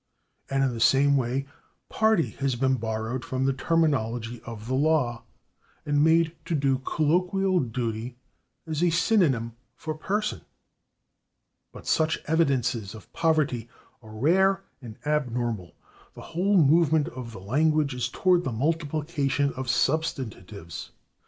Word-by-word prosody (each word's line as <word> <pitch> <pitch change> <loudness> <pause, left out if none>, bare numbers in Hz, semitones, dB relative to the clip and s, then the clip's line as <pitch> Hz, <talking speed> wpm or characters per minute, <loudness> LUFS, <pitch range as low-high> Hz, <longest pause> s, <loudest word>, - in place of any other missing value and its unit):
And 135 0 +1
in 130 -2 +1
the 115 - -5
same 135 +5 +4
way 130 +1 0 0.5
/party/ 220 -6 +2
has 135 -2 0
been 130 +2 +1
borrowed 110 +2 -3
from 130 -2 -2
the 135 - +2
terminology 120 -7 0
of 110 -2 -7
the 130 - -2
law 135 -4 +1 0.6
and 145 0 +2
made 165 +1 +3
to 170 - -1
do 135 -2 +1
colloquial 180 +7 +1
duty 120 -1 -3 0.5
as 160 -1 -3
a 175 - +4
synonym 165 - +2 0.2
for 155 -1 -5
/person/. 210 +7 -2 1.3
But - - -12
such 160 0 +2
evidences 125 - 0
of 110 - -14
poverty 150 -8 +1 0.3
are 110 - -14
rare 185 - +3 0.2
and 115 -4 -10
abnormal; 120 - -2 0.4
the - - -10
whole 195 +4 +2
movement 160 -1 +4
of 125 -2 -8
the 115 - -9
language 150 +7 +1
is 125 -1 -2
toward 180 +4 +2
the 130 - -2
multiplication 145 +1 -1
of 130 -1 -5
substantives. 125 - -2
140 Hz, 135 wpm, -26 LUFS, 120-160 Hz, 1.3 s, same